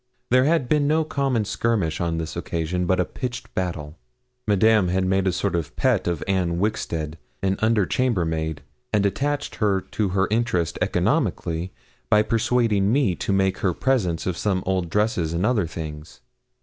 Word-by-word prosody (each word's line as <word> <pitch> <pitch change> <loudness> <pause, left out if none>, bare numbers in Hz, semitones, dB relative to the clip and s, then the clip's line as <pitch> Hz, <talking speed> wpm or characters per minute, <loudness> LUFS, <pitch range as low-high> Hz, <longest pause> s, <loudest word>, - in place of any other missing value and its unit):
There 130 +1 +5
had 155 -4 +2
been 145 +1 +2
no 160 +2 +3
common 135 -7 0
skirmish 100 -8 0
on 85 -1 -1
this 80 -1 -4
occasion, 85 +2 -2
but 95 0 +2
a 90 - +2
pitched 125 -2 -6
battle. 85 -4 -4 0.5
Madame 105 -1 +4
had 95 +1 +1
made 95 +1 +1
a - - +3
sort 95 +1 -1
of 85 -3 -3
pet - - +1
of 85 -3 -1
Anne 90 -3 0
Wixted, 85 -6 -2 0.2
an 95 0 +2
under 110 -3 +3
chambermaid, 80 - -1 0.3
and 105 -2 +2
attached 145 +8 -1
her 105 -4 +2
to 100 +1 -2
her 95 +1 +1
interest 90 -8 0
economically 85 +2 0 0.4
by 105 0 +5
persuading 110 -3 +2
me 130 -7 +2
to - - -2
make 95 -1 +1
her 90 -4 0
presents 105 -11 0
of 90 -2 -2
some 95 -3 0
old 95 -2 0
dresses 95 -5 0
and 85 +4 0
other 110 -7 +2
things. 80 -1 -8
95 Hz, 170 wpm, -23 LUFS, 85-115 Hz, 0.5 s, There